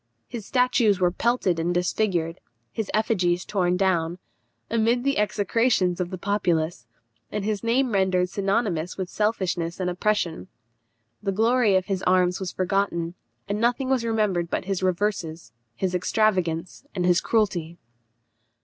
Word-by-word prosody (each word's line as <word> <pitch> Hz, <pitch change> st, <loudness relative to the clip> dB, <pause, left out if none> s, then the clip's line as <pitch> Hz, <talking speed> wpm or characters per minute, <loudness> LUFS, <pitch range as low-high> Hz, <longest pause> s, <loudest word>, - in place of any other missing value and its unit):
His 225 Hz, -4 st, -7 dB
statues 245 Hz, -6 st, +3 dB
were 180 Hz, -1 st, +3 dB
pelted 195 Hz, -4 st, +1 dB
and 175 Hz, +2 st, 0 dB
disfigured; 175 Hz, -2 st, 0 dB, 0.3 s
his 220 Hz, -3 st, -4 dB
effigies 180 Hz, -5 st, +1 dB
torn 180 Hz, -3 st, +1 dB
down, 175 Hz, -3 st, +1 dB, 0.5 s
amid 230 Hz, +2 st, +1 dB
the 275 Hz, -4 st, +1 dB
execrations 205 Hz, -2 st, +1 dB
of 175 Hz, -, -2 dB
the 185 Hz, -, -5 dB
populace, 170 Hz, -, -1 dB, 0.4 s
and 205 Hz, -1 st, -3 dB
his 215 Hz, 0 st, -2 dB
name 245 Hz, +2 st, +2 dB
rendered 190 Hz, -2 st, +2 dB
synonymous 195 Hz, -3 st, -1 dB
with 185 Hz, -2 st, -3 dB
selfishness 185 Hz, -6 st, -1 dB
and 180 Hz, -1 st, 0 dB
oppression. 180 Hz, -, -1 dB, 0.7 s
The 195 Hz, -, -1 dB
glory 225 Hz, 0 st, +3 dB
of 185 Hz, -1 st, +2 dB
his 195 Hz, -2 st, -2 dB
arms 180 Hz, 0 st, +2 dB
was 185 Hz, -2 st, -4 dB
forgotten, 185 Hz, -3 st, -1 dB, 0.3 s
and 205 Hz, +2 st, -2 dB
nothing 245 Hz, +3 st, +1 dB
was 260 Hz, -3 st, +2 dB
remembered 210 Hz, -7 st, 0 dB
but -, -, -2 dB
his 195 Hz, -1 st, -2 dB
reverses, 175 Hz, -, -1 dB, 0.2 s
his 185 Hz, +4 st, -2 dB
extravagance, 180 Hz, -3 st, 0 dB
and 180 Hz, -2 st, 0 dB
his 180 Hz, 0 st, +4 dB
cruelty. 175 Hz, -7 st, 0 dB
190 Hz, 140 wpm, -25 LUFS, 175-215 Hz, 0.7 s, his